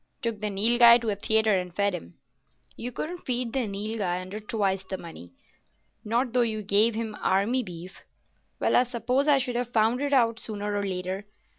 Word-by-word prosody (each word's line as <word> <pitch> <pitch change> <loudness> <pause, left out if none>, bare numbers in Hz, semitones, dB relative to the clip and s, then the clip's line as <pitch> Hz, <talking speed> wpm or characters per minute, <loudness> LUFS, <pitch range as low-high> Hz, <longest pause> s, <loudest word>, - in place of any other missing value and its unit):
"Took 230 -3 -2
the 210 0 -2
Nilghai 235 +4 +6
to 230 - -2
a - - -1
theatre 220 -1 +2
and 180 -1 -6
fed 200 0 +1
him." 85 - -8 0.6
"You 245 +2 -6
couldn't 340 +8 -5
feed 245 -2 -2
the 260 -4 0
Nilghai 200 -2 -3
under 185 +3 -7
twice 200 -3 -1
the 190 0 -5
money—not 170 - -7
though 250 - +4
you 220 -2 -1
gave 210 +3 +3
him 220 -1 -4
Army 205 +7 +1
beef. 180 -3 -10 0.6
Well, - - +2
I - - +6
suppose 250 +3 -1
I 290 -2 +5
should 250 -2 -2
have 245 0 -1
found 230 +2 +2
it 285 0 -1
out 230 -4 +3
sooner 205 -2 -4
or 205 - -1
later. 185 +2 -4
215 Hz, 185 wpm, -26 LUFS, 195-240 Hz, 0.6 s, Nilghai